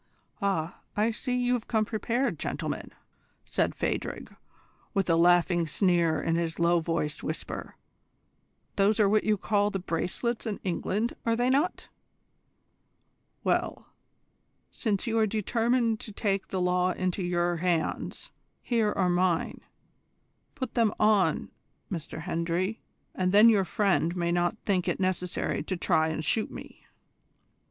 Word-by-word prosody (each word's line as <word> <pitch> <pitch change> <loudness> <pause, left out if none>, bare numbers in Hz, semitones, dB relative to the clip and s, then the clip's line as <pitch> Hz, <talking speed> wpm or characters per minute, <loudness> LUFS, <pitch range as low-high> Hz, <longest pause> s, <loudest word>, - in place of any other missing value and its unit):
"Ah, 190 -4 -1 0.2
I 215 +2 +3
see 250 +3 -2
that 250 - 0
you 245 0 +2
have 240 -3 -2
come 220 -2 +1
prepared, 230 - -1
gentlemen!" - - -4 0.5
said - - 0
Phadrig, - - -3 0.6
with 195 -1 +1
a - - +5
laughing 175 0 +4
sneer 170 -2 +2
in 165 0 0
his 165 -1 -2
low 170 0 +3
voiced 160 -2 -2
whisper. 155 - -5 1.0
"Those 205 +2 +3
are 210 - +5
what 215 +1 +2
you 215 -1 +2
call 205 +1 +1
the 195 - -2
bracelets 190 +7 -2
in 210 - -3
England, 200 +5 -1
are 230 0 +1
they 245 +2 +2
not? 295 +7 0 1.6
Well, - - -1 0.8
since 210 -5 -1
you 225 -1 +1
are 220 - +3
determined 225 +2 +1
to 215 - -8
take 200 -1 -1
the 190 - -3
law 180 0 +2
into 185 +1 -2
your 175 -1 0
hands 170 -1 -2 0.3
here 225 -4 +1
are 185 - +1
mine. 175 -1 +1 0.9
Put 260 -4 -4
them 230 -3 +2
on 210 -2 +2 0.4
M. 175 - -1 0.2
Hendry, 175 +4 -2 0.3
and 185 -1 0
then 210 +4 +8
your 200 -4 +3
friend 185 -4 +1
may 170 -1 0
not 175 +4 +1
think 185 -3 +1
it - - -1
necessary 185 -1 -1
to 185 - -3
try 160 -2 +2
and 160 -1 -3
shoot 220 +8 +1
me." - - -11
190 Hz, 145 wpm, -28 LUFS, 175-220 Hz, 1.6 s, then